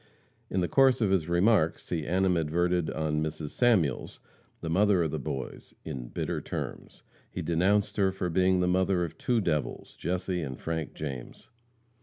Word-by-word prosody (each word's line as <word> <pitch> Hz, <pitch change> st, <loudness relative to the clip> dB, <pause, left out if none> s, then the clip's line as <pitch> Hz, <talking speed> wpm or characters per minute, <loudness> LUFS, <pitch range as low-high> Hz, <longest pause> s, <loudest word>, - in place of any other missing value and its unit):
In 95 Hz, -, 0 dB
the 90 Hz, -, +1 dB
course 135 Hz, +2 st, +4 dB
of 105 Hz, -5 st, +2 dB
his 85 Hz, -4 st, +1 dB
remarks 85 Hz, -1 st, +2 dB
he 80 Hz, -4 st, -2 dB
animadverted 90 Hz, -1 st, +1 dB
on 75 Hz, -1 st, -1 dB
Mrs. 80 Hz, -1 st, -4 dB
Samuels, 100 Hz, -, +1 dB, 0.4 s
the -, -, -5 dB
mother 95 Hz, +2 st, +3 dB
of 80 Hz, -, -1 dB
the 80 Hz, -, -2 dB
boys, 65 Hz, -1 st, -6 dB
in 60 Hz, -3 st, -5 dB
bitter -, -, -3 dB
terms. -, -, -6 dB, 0.3 s
He -, -, -5 dB
denounced 95 Hz, +5 st, +1 dB
her 100 Hz, -2 st, +4 dB
as 95 Hz, -2 st, -2 dB
being 95 Hz, +1 st, +3 dB
"the 90 Hz, -, +2 dB
mother 90 Hz, 0 st, +2 dB
of 85 Hz, -, -10 dB
two 120 Hz, -2 st, +1 dB
devils, 75 Hz, -6 st, -2 dB
Jesse 90 Hz, 0 st, -2 dB
and 65 Hz, -4 st, -5 dB
Frank 80 Hz, -2 st, -4 dB
James." 65 Hz, -5 st, -7 dB
85 Hz, 165 wpm, -29 LUFS, 80-95 Hz, 0.4 s, course